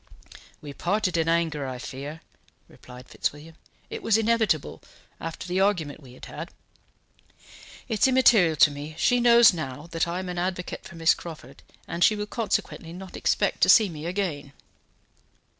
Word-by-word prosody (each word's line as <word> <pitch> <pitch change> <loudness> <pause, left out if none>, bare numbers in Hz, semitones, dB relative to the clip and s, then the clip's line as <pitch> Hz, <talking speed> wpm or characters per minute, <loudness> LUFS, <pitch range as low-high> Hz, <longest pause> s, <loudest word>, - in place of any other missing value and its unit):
"We 145 -1 -8
parted 190 +3 -1
in 165 -1 +1
anger, 160 -4 0
I 130 -1 -5
fear," 140 +5 -8 0.5
replied 125 0 -14
Fitzwilliam; 150 +3 -4 0.4
"it - - -5
was 220 - +3
inevitable, 225 -8 0 0.4
after 165 +1 -6
the 180 +1 -1
argument 175 -8 0
we 130 -3 -14
had - - -11
had. - - -8 1.4
It 220 -3 -3
is - - +5
immaterial 235 -10 +5
to 150 0 +5
me; 145 +2 -8
she 245 +7 +3
knows 235 -3 +7
now 150 -3 -6
that 165 0 0
I 170 +1 -3
am 185 0 -4
an 180 -1 -4
advocate 180 0 -4
for 170 - -11
Miss 165 0 +4
Crawford, 150 -5 -11 0.3
and 170 +1 -1
she 215 - +5
will 210 0 -3
consequently 210 -6 -3
not 185 +1 -10
expect - - 0
to - - +5
see 215 -4 +7
me 160 -1 -7
again." 170 -7 -3
170 Hz, 165 wpm, -25 LUFS, 150-200 Hz, 1.4 s, knows